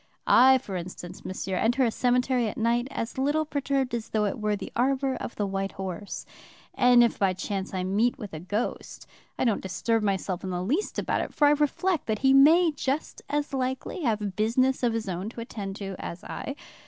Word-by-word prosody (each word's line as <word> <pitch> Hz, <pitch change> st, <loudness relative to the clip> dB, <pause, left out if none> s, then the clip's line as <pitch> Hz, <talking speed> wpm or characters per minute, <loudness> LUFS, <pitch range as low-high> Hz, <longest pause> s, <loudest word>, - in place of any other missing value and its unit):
I, 265 Hz, +1 st, +7 dB
for 205 Hz, -7 st, -7 dB
instance, 175 Hz, 0 st, -7 dB
monsieur, 185 Hz, 0 st, -3 dB
enter 240 Hz, +6 st, +2 dB
a 230 Hz, -, +1 dB
cemetery 250 Hz, 0 st, +1 dB
at 210 Hz, -, -5 dB
night 235 Hz, +2 st, +1 dB
as 230 Hz, +1 st, -4 dB
little 295 Hz, +3 st, +1 dB
perturbed 275 Hz, -3 st, -1 dB
as 230 Hz, -2 st, -3 dB
though 215 Hz, -1 st, +1 dB
it 205 Hz, -, -2 dB
were 210 Hz, -1 st, 0 dB
the 200 Hz, -, -7 dB
arbor 265 Hz, +2 st, +1 dB
of 240 Hz, -, -6 dB
the 205 Hz, -, -1 dB
White 195 Hz, 0 st, -3 dB
Horse. 190 Hz, +1 st, -6 dB, 0.5 s
And 245 Hz, -1 st, +6 dB
if 235 Hz, -, +1 dB
by 195 Hz, -2 st, +3 dB
chance 195 Hz, +1 st, -4 dB
I 185 Hz, -1 st, -2 dB
meet 210 Hz, +6 st, +1 dB
with 210 Hz, -6 st, -8 dB
a 155 Hz, -, -5 dB
ghost, 205 Hz, +8 st, -4 dB, 0.3 s
I -, -, 0 dB
don't 225 Hz, -4 st, +1 dB
disturb 225 Hz, +4 st, 0 dB
myself 195 Hz, -2 st, -1 dB
in 190 Hz, -, -3 dB
the 180 Hz, 0 st, -2 dB
least 300 Hz, -, -1 dB
about -, -, 0 dB
it, -, -, -6 dB
for 295 Hz, -, +4 dB
I 290 Hz, -, +6 dB
reflect 300 Hz, +4 st, +1 dB
that 215 Hz, -1 st, 0 dB
he 265 Hz, -, +6 dB
may 320 Hz, +5 st, +6 dB
just 280 Hz, 0 st, -3 dB
as 295 Hz, 0 st, -1 dB
likely 260 Hz, +6 st, -2 dB
have 210 Hz, -, -1 dB
business 250 Hz, +5 st, +2 dB
of 240 Hz, -2 st, +2 dB
his 225 Hz, -2 st, -3 dB
own 185 Hz, +3 st, -3 dB
to 230 Hz, -, -8 dB
attend 200 Hz, -4 st, -6 dB
to 195 Hz, -2 st, -5 dB
as 170 Hz, -, -6 dB
I. 275 Hz, -, -5 dB
230 Hz, 210 wpm, -27 LUFS, 195-265 Hz, 0.5 s, I